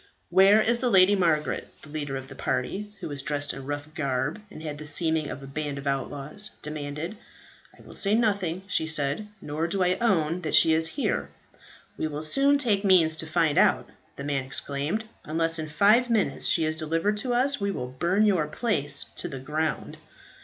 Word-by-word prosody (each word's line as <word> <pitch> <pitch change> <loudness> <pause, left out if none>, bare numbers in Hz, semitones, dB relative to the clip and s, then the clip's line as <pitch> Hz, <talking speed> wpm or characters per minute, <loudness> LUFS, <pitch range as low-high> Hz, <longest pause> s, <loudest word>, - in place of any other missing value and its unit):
"Where 195 +4 +6
is 235 +2 +2
the 250 - +1
Lady 195 -1 +6
Margaret?" 165 -5 0 0.2
the 150 - -12
leader 145 -2 -4
of 135 0 -8
the 135 - -10
party, 135 +12 -3
who - - -4
were 145 - -5
dressed 145 +1 -2
in 135 0 -9
rough 145 0 -4
garb, 140 +3 -2
and 160 - -11
had 150 -2 -5
the 155 - -7
seeming 160 -1 0
of 140 - -7
a - - -7
band 145 +1 -4
of 140 - -7
outlaws, 140 +8 -2
demanded. 150 +5 -5 0.6
"I - - -17
will - - -13
say 200 +1 +1
nothing," 200 -6 0
she 180 -5 0
said, 150 +5 -1 0.2
"nor 155 +3 -2
do 185 +2 0
I 180 +1 +1
own 180 -7 +1
that 155 -3 0
she 160 - +6
is 160 0 +3
here." 280 - -1 0.7
"We - - 0
will 150 0 -5
soon 275 - +4
take 220 -8 +1
means 175 -5 +5
to 160 - -4
find 160 -2 +2
out," - - +3 0.2
the 140 - -7
man 140 -2 -1
exclaimed. 145 +9 -2 0.2
"Unless 165 +1 +1
in 155 -1 -4
five 215 +10 +4
minutes 220 -4 +1
she 165 - +3
is 155 0 -1
delivered 165 +6 0
to 245 +3 -2
us, 270 0 +1
we 200 - 0
will 160 -10 -3
burn 175 +11 +1
your 180 -8 +2
place 150 - 0
to - - -2
the 135 - -6
ground." 150 +4 -3
160 Hz, 200 wpm, -26 LUFS, 145-200 Hz, 0.7 s, Where